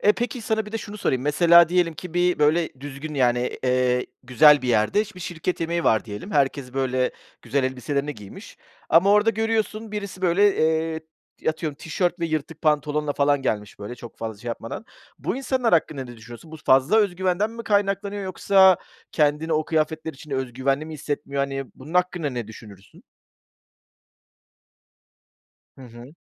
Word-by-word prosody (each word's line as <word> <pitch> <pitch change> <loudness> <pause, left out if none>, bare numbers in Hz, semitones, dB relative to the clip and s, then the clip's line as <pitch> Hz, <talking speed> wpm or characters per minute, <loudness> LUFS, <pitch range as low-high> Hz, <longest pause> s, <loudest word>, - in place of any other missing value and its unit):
E, 210 - +5
peki 240 +2 -3
sana 220 0 -1
bir 210 - -10
de 225 - -2
şunu 205 0 -8
sorayım. 130 -10 0
Mesela 170 +3 +6
diyelim 175 -2 +1
ki 180 +1 -9 0.3
böyle 155 +3 +3
düzgün, 145 +2 -7
yani, 125 -2 +1
eee, 125 0 +1 0.2
güzel 145 +3 +6
bir 125 - -2
yerde, 115 - +3
bir 180 - -11
şirket 175 +1 -3
yemeği 170 +1 -1
var 110 -3 +3
diyelim. 105 - -8
Herkes 135 -4 0
böyle 130 -1 0 0.3
güzel 130 +3 0
elbiselerini 140 +3 -2
giymiş 105 -4 -12 0.3
ama 170 +5 +5
orada 210 +2 +5
görüyorsun, 220 0 -2
birisi 200 -3 -6
böyle, 190 +3 +3
eee, 160 0 +1 0.5
atıyorum 155 -2 -2
tişört 175 +3 -2
ve 170 - 0
yırtık 155 0 -4
pantolonla 150 -1 +1
falan 145 -1 +2
gelmiş, 105 -4 -3
böyle 105 +4 -7
çok 120 -2 -12
fazla 110 -2 -5
şey 120 - -7
yapmadan. 115 - -6 0.3
Bu - - -3
insanlar 260 -3 0
hakkında 155 -5 +1
ne 120 -1 -11
düşünüyorsun? 120 +7 -12
Bu 160 - -7
fazla 135 +7 +3
özgüvenden 190 0 +1
mi 230 0 -8
kaynaklanıyor 200 -1 0
yoksa 190 0 +5 0.4
kendini 150 +1 +1
o 155 0 +1
kıyafetler 160 0 -1
içinde 145 0 -8
özgüvenli 130 +3 -1
mi 160 - -7
hissetmiyor? 140 -1 -3
Hani, 135 0 -3
bunun 150 +6 -11
hakkında 180 -4 +1
ne 120 -4 -4
düşünürsün? 105 -3 -14 2.7
Hı - - -11
hı. 120 +5 -13
155 Hz, 160 wpm, -23 LUFS, 130-180 Hz, 2.7 s, Mesela